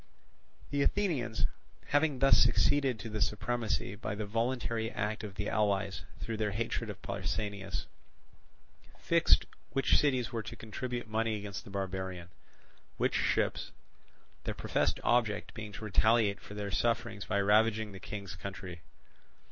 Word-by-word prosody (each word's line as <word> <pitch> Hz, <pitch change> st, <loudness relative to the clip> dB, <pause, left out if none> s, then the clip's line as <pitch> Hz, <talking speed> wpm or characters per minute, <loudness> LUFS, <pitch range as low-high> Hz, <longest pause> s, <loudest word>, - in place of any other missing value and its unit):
The 145 Hz, -, +1 dB
Athenians, 140 Hz, -, +1 dB, 0.4 s
having 145 Hz, -1 st, +3 dB
thus 135 Hz, +1 st, +6 dB
succeeded 140 Hz, -4 st, +4 dB
to 110 Hz, -, -7 dB
the 105 Hz, -1 st, -3 dB
supremacy 105 Hz, 0 st, 0 dB
by 105 Hz, 0 st, -4 dB
the 105 Hz, 0 st, -3 dB
voluntary 115 Hz, +1 st, 0 dB
act 105 Hz, -1 st, -2 dB
of 100 Hz, -3 st, -6 dB
the 105 Hz, +1 st, -2 dB
allies 100 Hz, -2 st, +1 dB
through 115 Hz, -1 st, -3 dB
their 105 Hz, -1 st, +1 dB
hatred 115 Hz, +1 st, -2 dB
of 100 Hz, -1 st, -8 dB
Pausanias, 100 Hz, 0 st, -3 dB, 1.1 s
fixed -, -, +4 dB, 0.3 s
which 135 Hz, -, +3 dB
cities 130 Hz, -4 st, +2 dB
were 115 Hz, -2 st, -2 dB
to -, -, -7 dB
contribute 120 Hz, +2 st, -4 dB
money 110 Hz, 0 st, 0 dB
against 100 Hz, -1 st, -6 dB
the -, -, -10 dB
barbarian, 95 Hz, -2 st, -4 dB, 0.7 s
which -, -, +1 dB
ships; -, -, +1 dB, 0.7 s
their -, -, -3 dB
professed -, -, +1 dB
object 110 Hz, -4 st, +2 dB
being 110 Hz, -2 st, -6 dB
to 110 Hz, +2 st, -6 dB
retaliate 110 Hz, 0 st, +4 dB
for 105 Hz, -, -10 dB
their 100 Hz, -1 st, -3 dB
sufferings 115 Hz, -1 st, 0 dB
by 100 Hz, -2 st, +1 dB
ravaging 110 Hz, +1 st, +3 dB
the 95 Hz, -, -9 dB
King's 100 Hz, -3 st, -6 dB
country. 90 Hz, -2 st, -7 dB
110 Hz, 140 wpm, -32 LUFS, 100-115 Hz, 1.1 s, thus